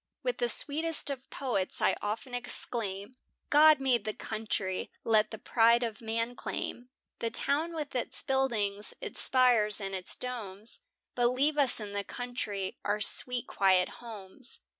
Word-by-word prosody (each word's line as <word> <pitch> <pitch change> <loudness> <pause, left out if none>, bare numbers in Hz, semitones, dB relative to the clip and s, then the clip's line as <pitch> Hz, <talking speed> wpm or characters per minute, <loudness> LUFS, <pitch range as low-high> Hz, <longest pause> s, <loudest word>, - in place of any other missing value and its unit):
With - - -2
the 485 - +1
sweetest 315 0 +1
of 265 -1 -7
poets 235 -9 -2
I - - +3
often 220 +5 -4
exclaim, 225 -3 -2 0.4
"God 305 0 +7
made 260 -3 +1
the 215 - -4
country," 210 -4 -3
let 215 -1 +3
the 220 - -7
pride 235 +2 +3
of 225 -3 -4
man 230 +2 -2
claim 245 +1 -5 0.3
The 230 - -1
town 300 +7 0
with 300 -3 -5
its 250 - 0
buildings, 225 -7 0
its - - +2
spires, 240 -5 +4
and 195 -1 -5
its 185 -1 -4
domes, 220 -4 -5 0.3
But 245 -1 +2
leave 285 +5 +1
us 270 -4 +3
in 210 -2 -6
the 200 0 -2
country 210 -5 -5
our 210 +1 0
sweet 245 +4 +2
quiet 185 -2 +3
homes. 225 +2 -9
235 Hz, 155 wpm, -30 LUFS, 205-260 Hz, 0.4 s, God